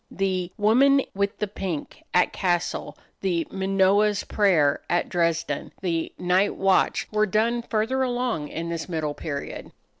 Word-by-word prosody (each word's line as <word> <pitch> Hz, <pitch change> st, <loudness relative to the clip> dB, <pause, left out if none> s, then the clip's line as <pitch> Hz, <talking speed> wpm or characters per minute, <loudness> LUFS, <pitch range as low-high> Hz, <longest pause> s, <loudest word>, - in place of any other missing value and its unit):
The 185 Hz, -2 st, -1 dB
"Woman 265 Hz, +6 st, +4 dB
with 200 Hz, +1 st, -1 dB
the -, -, -1 dB
Pink," 190 Hz, -6 st, -5 dB
at 180 Hz, -, +3 dB
Cassel, 175 Hz, -2 st, -1 dB, 0.2 s
the 175 Hz, -4 st, 0 dB
"Manoah's 195 Hz, +2 st, +2 dB
Prayer," 170 Hz, -9 st, +2 dB
at 175 Hz, -, +1 dB
Dresden, 165 Hz, -4 st, -1 dB
the 165 Hz, -3 st, -1 dB
"Night 180 Hz, +3 st, +2 dB
Watch," 195 Hz, -1 st, +2 dB
were 215 Hz, 0 st, +2 dB
done 230 Hz, +4 st, +1 dB
further 230 Hz, +3 st, -1 dB
along 245 Hz, -, -1 dB
in 165 Hz, +3 st, -5 dB
this 170 Hz, +1 st, -4 dB
middle 155 Hz, -3 st, -2 dB
period. 145 Hz, -2 st, -6 dB
190 Hz, 140 wpm, -25 LUFS, 170-210 Hz, 0.2 s, Woman